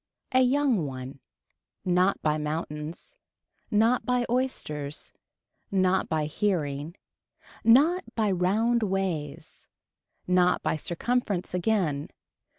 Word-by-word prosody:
A 255 - +4
young 255 - +2
one. 130 0 -7 0.7
Not 180 +2 +2
by 155 0 +1
mountains. 150 - -5 0.5
Not 225 +4 +3
by 250 -1 +1
oysters. 150 - -2 0.6
Not 190 -1 +2
by 155 -1 0
hearing. 155 -3 -1 0.7
Not 305 +11 +5
by 215 -3 +1
round 215 +6 +2
ways. 190 -8 -3 0.6
Not 180 0 +3
by - - +1
circumference 195 +4 -1
again. 180 -6 0
185 Hz, 95 wpm, -27 LUFS, 155-230 Hz, 0.7 s, Not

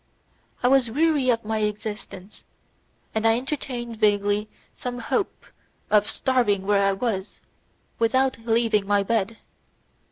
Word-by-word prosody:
I - - +5
was 260 -2 +4
weary 290 0 +2
of 230 -2 +1
my 220 0 -1
existence, 210 -2 -5 0.7
and 220 +1 +1
I 225 0 +4
entertained 245 -3 -4
vaguely 205 0 +2 0.2
some 245 -1 -5
hope 310 - -2 0.5
of 210 -1 +4
starving 230 -7 +1
where 200 0 +3
I 195 0 +3
was, 195 -2 -3 0.6
without 260 +2 +2
leaving 225 -3 +1
my 205 -1 +3
bed. 225 +1 -1
225 Hz, 125 wpm, -24 LUFS, 205-245 Hz, 0.7 s, I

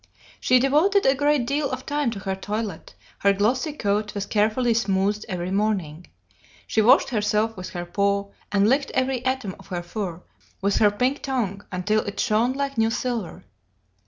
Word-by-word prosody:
She 255 - +4
devoted 305 +10 +3
a 270 - +5
great 290 -2 +2
deal 285 +3 0
of - - -5
time 290 -3 0
to 220 -3 -5
her 190 0 -2
toilet, 210 +2 -5 0.2
her 200 0 +4
glossy 245 +9 +1
coat 210 -6 -1
was 200 -1 -2
carefully 220 +4 +2
smoothed 205 -1 0
every 180 -1 -3
morning. 190 -6 -1 0.6
She 220 - +1
washed 230 +5 +5
herself 215 -1 0
with 185 0 -7
her 175 -1 -5
paw, 200 +2 0 0.2
and 200 0 +3
licked 275 +4 +2
every 260 -1 0
atom 260 -7 -2
of - - -15
her 175 -2 -4
fur 180 -2 -5 0.4
with 200 +1 +1
her 210 - +5
pink 250 +7 0
tongue 215 -7 -2
until 195 +4 +1
it 200 - -6
shone 235 +2 +2
like 275 -2 -2
new 225 0 +3
silver. 235 - -3
215 Hz, 175 wpm, -24 LUFS, 200-255 Hz, 0.6 s, a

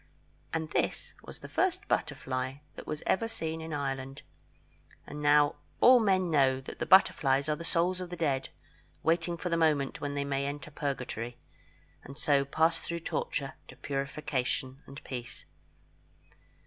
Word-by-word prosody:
And 160 -1 -2
this - - -1
was - - -11
the - - -8
first - - 0
butterfly 130 0 -1 0.2
that - - -9
was 155 -1 -4
ever 225 +4 +2
seen 160 -8 -3
in 160 0 -6
Ireland; 135 -2 -3 0.8
and 150 +1 -7
now 145 0 +4 0.2
all 250 0 +8
men 190 -5 +2
know 135 -3 +4
that 135 - -9
the - - -2
butterflies 140 -7 +5
are 150 - +1
the 170 - -8
souls 175 +2 +1
of 180 - -5
the 175 - -5
dead, 140 -6 0 0.5
waiting 170 +1 +1
for 180 - -3
the 170 - +1
moment 150 -4 +2
when 145 0 -3
they 140 0 -1
may 140 0 -1
enter 145 +1 -6
Purgatory, 125 -5 -4 0.7
and 140 +1 -10
so 145 -2 +3
pass 160 +4 +2
through 170 0 -5
torture 140 -3 -2
to 130 - -12
purification 135 -1 -2
and 140 - -10
peace. 125 -2 -7
145 Hz, 160 wpm, -30 LUFS, 135-165 Hz, 0.8 s, all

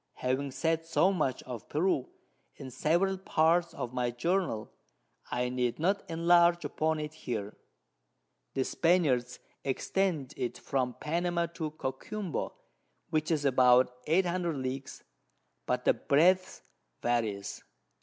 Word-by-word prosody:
Having 130 +2 -1
said 160 +5 -1
so 185 +3 +3
much 150 -8 -1
of 125 -4 -8
Peru 155 -4 +1 0.5
in 130 - -9
several 175 +9 +1
Parts 170 -1 +2
of 120 - -4
my 125 -1 0
Journal, 120 - -1 0.6
I 125 0 0
need 125 -1 -1
not 195 +5 +1
enlarge 170 +1 +4
upon 160 0 0
it 150 0 -5
here; 110 -9 -5 1.0
the 135 - +2
Spaniards 145 -8 +2 0.3
extend 150 +1 -1
it 120 -1 -3
from 130 -2 -1
Panama 170 +2 0
to 160 -2 -3
Coquimbo, 155 +6 -4 0.6
which 155 0 0
is 155 -3 +1
about 125 -1 +5
800 175 0 +1
Leagues, 130 +1 -5 0.6
but - - -1
the - - +6
Breadth 185 +6 +2 0.4
various. 110 -5 -1
150 Hz, 120 wpm, -30 LUFS, 125-170 Hz, 1.0 s, the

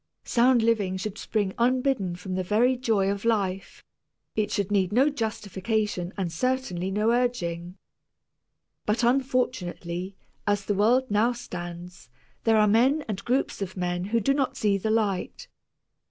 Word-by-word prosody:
Sound 240 0 +3
living 205 -5 +1
should 205 +2 -5
spring 205 -4 -1
unbidden 250 -6 +1
from 185 +1 -6
the 185 - 0
very 220 +7 +2
joy 220 -6 +1
of 200 0 -4
life; 195 -5 -1 0.5
it 215 -1 0
should 200 0 -1
need 195 -2 +2
no 260 +7 +4
justification 210 -5 -2
and 185 -4 -2
certainly 190 -3 -1
no 210 +3 +1
urging. 185 -8 -1 1.1
But 220 +3 +1
unfortunately, 235 -8 -1 0.3
as 205 -1 +1
the 205 - 0
world 235 +5 +2
now 220 +4 +3
stands, 175 - -8 0.4
there 225 -1 +4
are 210 0 +5
men 255 +8 +3
and 210 -3 -4
groups 250 -3 0
of 190 -1 -4
men 175 0 -1
who 230 +4 +1
do 275 +6 +2
not 275 -2 -1
see 205 -2 +2
the 195 +3 -2
light. 215 - -1
210 Hz, 150 wpm, -26 LUFS, 185-240 Hz, 1.1 s, are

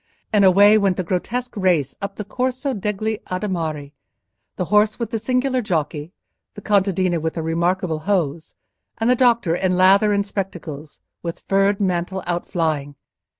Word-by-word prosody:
And 205 -2 +4
away 205 +3 +6
went 195 -3 +1
the 185 - -1
grotesque 240 +9 -3
race 175 - +1
up 200 0 -4
the 210 - -5
Corso 255 +4 -2
degli 210 +1 -2
Adimari—the 165 -3 -6
horse 210 +3 +3
with 230 -2 -4
the 225 - -1
singular 255 +3 0
jockey, 155 -5 -2 0.4
the 205 - -9
contadina 190 -4 +1
with 160 0 -2
the 165 - -3
remarkable 170 0 0
hose, 165 -4 -2 0.4
and 225 +2 +2
the - - +4
doctor 235 -9 +3
in 185 0 0
lather 195 +3 +5
and 200 0 +1
spectacles, 165 -7 -6 0.2
with 170 -1 -6
furred 195 +1 +2
mantle 185 -1 -1
outflying. 160 -5 -2
190 Hz, 150 wpm, -21 LUFS, 170-210 Hz, 0.4 s, away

